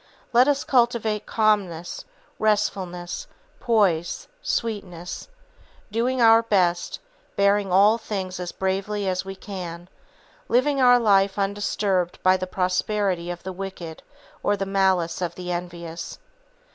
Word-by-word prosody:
Let 245 +3 +6
us 285 -1 +2
cultivate 235 -4 +1
calmness, 200 -6 0 0.3
restfulness, 190 -5 -1 0.3
poise, 200 -9 +1
sweetness, 190 -7 -4 0.6
doing 245 +4 0
our 225 -1 +7
best, 180 -6 +1 0.4
bearing 200 -1 +2
all 205 +5 +5
things 190 -4 -4
as 180 -1 -4
bravely 195 +2 -2
as 185 0 -1
we 195 0 -6
can; 180 -3 -7 0.6
living 275 +3 +2
our 245 -1 +7
life 200 -4 +3
undisturbed 195 -2 0
by 185 0 +5
the 185 0 -3
prosperity 185 0 0
of 175 -1 -6
the 190 +1 -5
wicked 180 -4 -7 0.4
or 205 - +1
the 195 - -2
malice 190 -3 +1
of 175 -1 -2
the 180 -1 -5
envious. 170 -1 -6
195 Hz, 120 wpm, -24 LUFS, 180-215 Hz, 0.6 s, our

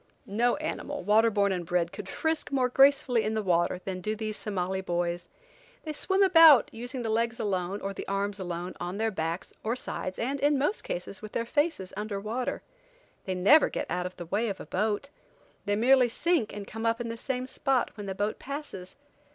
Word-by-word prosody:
No 235 +5 +1
animal, 290 -3 -4
waterborn 210 0 +3
and 180 -2 -2
bred, 170 0 0
could 195 -1 -7
frisk, 320 +5 -2
more 260 -2 +2
gracefully 270 -2 +4
in 215 +1 -1
the 215 - -1
water 175 0 +1
than 185 -1 -4
do 215 +4 -2
these 215 -1 -3
Somali 190 -2 -2
boys. 175 -1 -2 0.5
They 310 - -4
swim 385 +6 +2
about, 330 -7 +7
using 245 +2 -5
the 225 - -2
legs 230 +1 0
alone, 190 -1 -2
or 195 0 -3
the - - -7
arms 200 +1 -1
alone, 175 0 -4
on 175 +2 -4
their 225 +1 0
backs, 165 -1 -3
or 225 +2 0
sides, 185 -6 -4
and, 270 +4 -2
in 290 +1 +3
most 295 +11 0
cases, 180 +2 -5
with 215 -1 -9
their 230 - -1
faces 290 - -1
under 210 0 -3
water. 225 +5 -3 0.6
They 185 - -2
never 210 +13 +6
get - - -3
out 180 +1 -1
of 180 - -12
the 175 - -6
way 210 +7 0
of 195 - -5
a - - -7
boat. 215 +7 -1 0.6
They 205 - +1
merely 250 +3 +5
sink 320 -2 +1
and 205 -1 -7
come 225 +2 -4
up 230 +1 +1
in 235 -1 -3
the 230 - -4
same 250 +2 -3
spot 260 -1 0
when 205 -2 -8
the 190 - -3
boat 205 +2 -2
passes. 275 -10 -7
215 Hz, 205 wpm, -28 LUFS, 190-255 Hz, 0.6 s, about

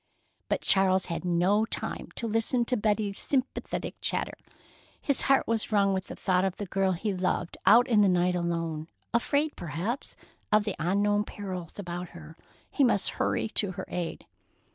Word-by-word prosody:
But - - 0
Charles 190 -1 +4
had 165 - -4
no 180 +4 +2
time 225 - -3
to 235 - -2
listen 225 +2 +1
to 250 - +1
Betty's 210 -2 0
sympathetic 265 -2 -2
chatter. - - 0 0.7
His 280 -3 +1
heart 270 0 +3
was 225 -1 -1
wrung 200 -2 +3
with 190 0 -2
the - - -8
thought 185 -1 +1
of 190 -1 0
the 205 - -4
girl 190 0 +1
he 200 +4 -2
loved 180 -2 -1
out 235 +5 +7
in 220 -4 +4
the 200 - +5
night 180 0 +2
alone, 165 -3 -2 0.3
afraid 285 +6 +1
perhaps 175 - -4 0.4
of 215 0 +5
the 205 -3 -3
unknown 205 +5 +2
perils 185 -5 -7
about 175 -2 -5
her. 160 0 -12 0.4
He 280 - +2
must 230 -6 +3
hurry - - +1
to 200 -3 0
her - - -6
aid. 175 -2 -4
195 Hz, 170 wpm, -28 LUFS, 180-220 Hz, 0.7 s, out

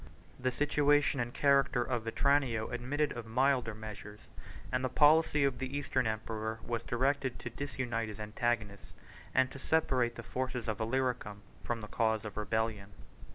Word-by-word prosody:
The 130 0 +1
situation 145 +1 +2
and 120 0 -1
character 140 -3 +3
of 120 -2 -2
Vetranio 125 -2 +1
admitted 130 +5 -1
of 120 -2 -6
milder 125 -1 +2
measures; 105 -1 -9 0.5
and 130 0 0
the 130 - +1
policy 150 0 +5
of 135 -3 +1
the 130 +2 -3
Eastern 130 -4 0
emperor 110 0 -3
was 115 -1 -2
directed 130 +1 0
to 115 - -7
disunite 120 -3 -3
his 105 - -8
antagonists, 105 -1 -2 0.4
and 130 - +3
to 135 - -9
separate 130 -6 +1
the - - -7
forces 125 -2 -3
of 110 -2 -2
Illyricum 115 -3 -1 0.2
from 120 -1 -2
the 105 - -7
cause 110 0 0
of 105 - -6
rebellion. 105 -1 -1
120 Hz, 155 wpm, -32 LUFS, 110-135 Hz, 0.5 s, policy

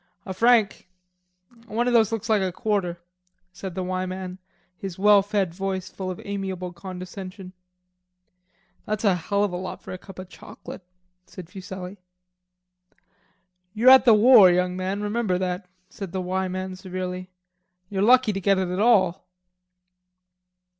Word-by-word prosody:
"A 190 - -5
franc; 225 -2 +2 0.8
one 235 +3 -1
of 245 - +1
those 225 -2 +4
looks 225 -3 -3
like 215 -2 +2
a 190 -1 -1
quarter," 190 -4 -2 0.5
said 185 -1 -7
the 185 - -2
"Y" 185 0 -2
man, 185 0 -6 0.4
his 190 -2 -7
well 205 +1 +6
fed 195 -3 -1
voice 190 0 -3
full 190 -1 -5
of 185 - -6
amiable 190 -3 -4
condescension. 185 +1 -9 1.3
"That's 215 0 -2
a 200 -3 +4
hell 200 +4 -1
of 200 -3 -1
a - - -2
lot 185 +1 -7
for - - -9
a 185 - -6
cup 195 -1 -13
of 185 0 -8
chauclate," 185 - -11 0.5
said 185 -2 -11
Fuselli. 190 0 -8 1.8
"You're 240 +4 +6
at 265 0 +8
the 230 -3 +7
war, 215 -3 +8
young 180 0 +1
man, 190 +2 -3
remember 210 -3 0
that," 180 0 -3 0.2
said 190 -2 -8
the 190 - -2
"Y" 185 +1 -2
man 185 0 -5
severely. 185 0 -6 0.6
"You're 195 -1 -3
lucky 245 0 +5
to 195 - -4
get 195 +1 +3
it 190 -1 -1
at 180 +1 -3
all." 195 -6 +3
190 Hz, 155 wpm, -24 LUFS, 185-205 Hz, 1.8 s, at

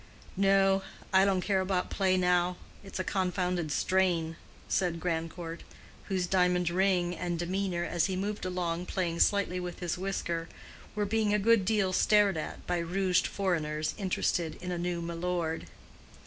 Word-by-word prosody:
"No; 195 0 +4 0.3
I 190 +1 +6
don't 190 -2 +2
care 190 0 +1
about 185 -1 -1
play 190 -1 +2
now. 180 0 +2 0.3
It's 195 - -7
a 185 - -1
confounded 180 -4 -1
strain," 175 -2 +1 0.3
said 175 -3 0
Grandcourt, 165 0 -3 0.4
whose 185 -3 -1
diamond 180 -1 +2
ring 180 -1 +2
and 175 -1 -2
demeanor, 175 0 -1
as 175 +1 +1
he 190 - -2
moved 205 +3 -3
along 180 -1 -2
playing 170 -3 -2
slightly 200 -3 +2
with 180 -1 -5
his 175 -1 -3
whisker, 170 -3 -2 0.5
were 210 -1 0
being 210 0 +1
a - - +4
good 210 -1 +4
deal 200 -3 +1
stared 205 -1 +4
at 155 - -5
by 175 -1 0
rouged 180 +2 +1
foreigners 155 -6 -1
interested 175 -4 -1
in 180 - -5
a 175 - -2
new 175 -1 -2
milord. 170 -1 -2
180 Hz, 155 wpm, -30 LUFS, 170-195 Hz, 0.5 s, I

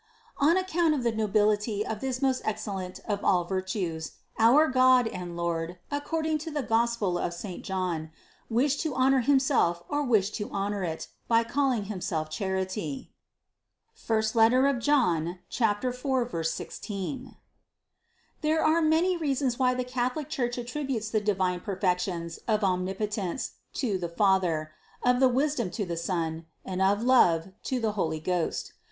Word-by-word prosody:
On 310 +5 +4
account 345 -4 +2
of 265 - -2
the 235 - +2
nobility 210 0 +1
of 220 -1 -4
this 260 0 -2
most 265 -1 +2
excellent 195 -4 -4
of 205 -1 -2
all 180 -2 +3
virtues, 185 -3 -3 0.3
our 255 +8 +6
God 255 -2 +5
and 175 -4 -6
Lord, 170 0 -2
according 315 +2 -1
to 320 +2 -6
the 295 -3 -2
Gos 235 +1 +1
pel 180 -5 0
of 170 - -2
St. 180 +1 -7
John, 180 -5 -2 0.4
wished 260 +5 +2
to 315 -5 -2
honor 265 +1 +4
Himself 255 -10 +2
or 290 0 0
wished 215 -7 +2
to 205 - -4
honor 200 0 -2
it, 160 -2 -4 0.2
by 230 0 +4
calling 260 -3 0
Himself 180 -6 -3
Charity 190 - -3 1.0
(I 225 +5 +4
John 180 - +1
4, 245 - -1
16). 210 - -5 1.1
There 315 +1 +2
are 320 +2 +4
many 325 +4 +3
reasons 270 -5 0
why 255 -1 +3
the 250 - -1
Catholic 250 +3 -2
Church 245 -2 -1
attrib 265 +4 -4
utes 220 -4 -2
the 215 - +1
divine 185 -3 0
perfections 180 -3 -2
of 215 -2 +1
omnipotence 190 +3 -1 0.2
to 210 -8 -1
the 170 -1 -3
Fa 190 +2 +3
ther, 155 -3 -2 0.3
of 250 +1 +3
wisdom 265 -5 0
to 205 +2 -3
the 170 -1 -3
Son, 165 -1 -2 0.2
and 185 0 -3
of 200 +3 +3
love 185 -10 +4 0.2
to 260 - -1
the 225 -2 0
Holy 160 -6 -1
Ghost. 175 +1 -2
215 Hz, 150 wpm, -28 LUFS, 185-260 Hz, 1.1 s, our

